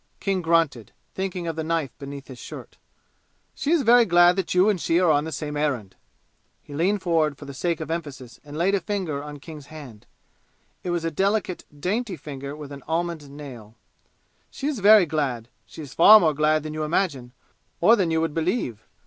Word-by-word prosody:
King 195 -2 -1
grunted, 165 - +1 0.2
thinking 190 -2 -4
of 165 -1 -3
the 160 - -3
knife 160 -5 -2
beneath 140 -1 -8
his 130 -3 -11
shirt. - - -10 0.7
"She 290 - -4
is 330 -3 +3
very 240 +1 +6
glad 175 -2 +5
that 190 -3 -2
you 185 +3 +5
and 200 -5 +1
she 165 - +2
are 180 -3 +4
on 145 0 +2
the 160 - -5
same 150 0 -4
errand." 130 -10 -2 0.7
He 145 - -12
leaned 185 +7 0
forward 160 -5 +1
for 145 - -10
the 140 - -8
sake 170 +4 -2
of 160 0 -5
emphasis 145 -8 -6
and 150 0 -9
laid 180 +4 +2
a 200 - +3
finger 175 -8 -3
on 150 0 -8
King's 150 -1 -11
hand. 140 -9 -12 0.8
It 180 - -4
was 175 -1 -1
a 165 - -1
delicate, 195 +2 -1
dainty 200 +3 -2
finger 140 -1 -7
with 150 -2 -9
an 140 -1 -9
almond 165 -2 -2
nail. 130 -7 -11 0.7
"She 275 - -7
is 290 -5 -1
very 205 -1 +7
glad. 135 -7 -2 0.2
She 160 - -10
is 135 -2 -10
far 215 +7 +9
more 160 -5 +2
glad 155 +1 +2
than 155 0 -6
you 155 - -4
imagine, 150 -6 -1 0.5
or 220 +7 +6
than 190 -6 0
you 160 0 +1
would 165 -2 -1
believe. 160 - -2
160 Hz, 200 wpm, -24 LUFS, 145-180 Hz, 0.8 s, far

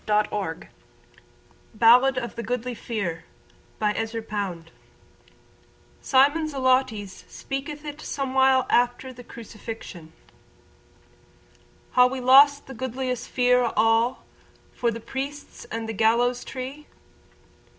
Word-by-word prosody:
Ezra 210 0 +3
Pound 190 -6 -4 1.1
Ballad 250 +4 +5
of 240 -2 -3
the 235 - -4
Goodly 245 +2 -3
Fere 200 -8 -4 0.6
(Fere 210 -1 +1
= - - -14
Mate, 225 0 -2
Companion) 205 -7 -4 1.4
SIMON 290 +4 +3
Zelotes 255 -8 0
speaketh 290 +2 -6
it 295 0 -7
somewhile 265 -1 +2
after 245 +2 +1
the 245 0 -12
Crucifixion 220 -7 -10 1.8
Ha' 250 0 +6
we 260 +1 -4
lost 280 +3 +6
the 265 - -9
goodliest 255 0 -4
fere 250 0 +3
o' 235 - -1
all 225 +3 +2 0.5
For 240 - 0
the 230 0 -4
priests 275 +5 -7
and 225 0 -5
the 225 - -4
gallows 235 +3 +2
tree? 265 +3 -7
245 Hz, 115 wpm, -24 LUFS, 225-265 Hz, 1.8 s, Ha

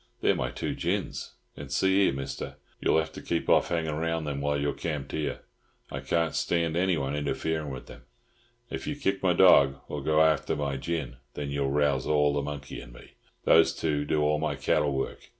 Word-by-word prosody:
They're - - +4
my 65 - -2
two - - -3
gins. - - -3 0.2
And 70 -1 -9
see 95 +7 +3
here, - - +3
Mister, 70 0 -5 0.2
you'll - - +3
have 80 0 0
to - - -9
keep 85 - -2
off - - +4
hangin' 80 -3 -1
round 80 0 -1
them 70 -1 -3
while 70 0 0
you're 70 0 0
camped 75 -4 -4
here. 75 - -3 0.5
I - - -3
can't 85 -2 0
stand 85 -2 0
anyone 85 -6 +1
interferin' 80 +1 -2
with 65 -2 -7
them. - - -12 0.7
If - - -5
you 150 - -2
kick 100 -9 -1
my 90 -2 +3
dorg, 70 -7 +6
or 75 - -4
go 80 +2 +4
after 80 -2 +2
my 70 -2 -2
gin, 70 -4 -3 0.2
then 70 -1 -4
you 70 -1 0
rouse 70 -2 +1
all 75 -1 +3
the 70 - 0
monkey 70 -1 -6
in - - -12
me. - - -14 0.3
Those - - +5
two 75 -2 0
do 75 +1 +1
all 75 0 +2
my 80 - -1
cattle 75 - +1
work. 65 - -4
75 Hz, 205 wpm, -28 LUFS, 70-80 Hz, 0.7 s, dorg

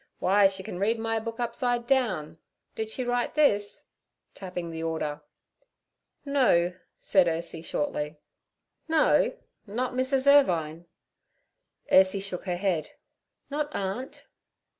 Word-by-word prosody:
Why, 200 +1 +4
she 190 0 -5
can 180 - -6
read 220 +4 +1
my 225 0 -1
book 230 +1 -6
upside 240 0 -1
down. 190 - 0 0.3
Did 220 0 -4
she 255 +3 -3
write 245 +1 -1
this?' 205 -10 +2 0.5
tapping 180 -3 -6
the 160 0 -6
order. 160 -2 -3 1.0
'No' 205 -12 +3 0.2
said 190 -3 +3
Ursie 165 0 -3
shortly. 150 -1 -3 0.7
'No? 320 -1 +3 0.3
Not 245 +5 -2
Mrs. 260 +1 +1
Irvine?' 170 - +3 1.0
Ursie 190 +1 +5
shook 190 -2 -5
her 180 -2 -2
head. 175 -5 -1 0.6
'Not 295 +1 -1
aunt.' 200 +7 -4
200 Hz, 120 wpm, -27 LUFS, 170-245 Hz, 1.0 s, Ursie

